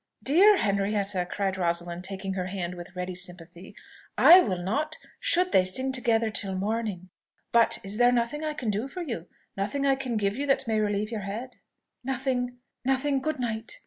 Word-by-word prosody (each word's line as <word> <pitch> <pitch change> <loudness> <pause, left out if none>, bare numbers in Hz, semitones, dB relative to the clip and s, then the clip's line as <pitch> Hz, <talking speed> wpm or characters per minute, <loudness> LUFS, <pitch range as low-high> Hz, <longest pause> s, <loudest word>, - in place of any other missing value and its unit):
"Dear 380 +9 +6
Henrietta!" 200 - 0
cried 195 -1 -2
Rosalind, 175 0 -1
taking 190 0 -4
her 185 -1 -3
hand 180 -2 -4
with 175 +1 -10
ready 180 0 -4
sympathy, 180 -1 -6 0.4
"I 355 +2 +9
will 190 - 0
not, 290 - -2 0.2
should 370 -7 +2
they 185 - +5
sing 260 +9 +1
together 230 -3 +1
till 195 -2 -1
morning. 200 -2 -3 0.4
But 235 -1 +5
is 200 +2 -3
there 245 +1 +5
nothing 245 +5 -1
I 305 -1 -2
can 240 -8 -2
do 210 +6 -2
for 360 +6 -6
you 225 - -5 0.3
nothing 210 +9 -2
I 275 - +4
can 260 -4 -2
give 200 +1 0
you 285 +1 -2
that 270 -2 +1
may 220 -1 +1
relieve 210 +1 -1
your 220 -3 -3
head?" 245 +5 -6 0.5
"Nothing, 250 -1 -2 0.3
nothing! 270 +2 +1
Good 310 0 -2
night!" 230 -1 -3
220 Hz, 180 wpm, -27 LUFS, 190-265 Hz, 0.5 s, I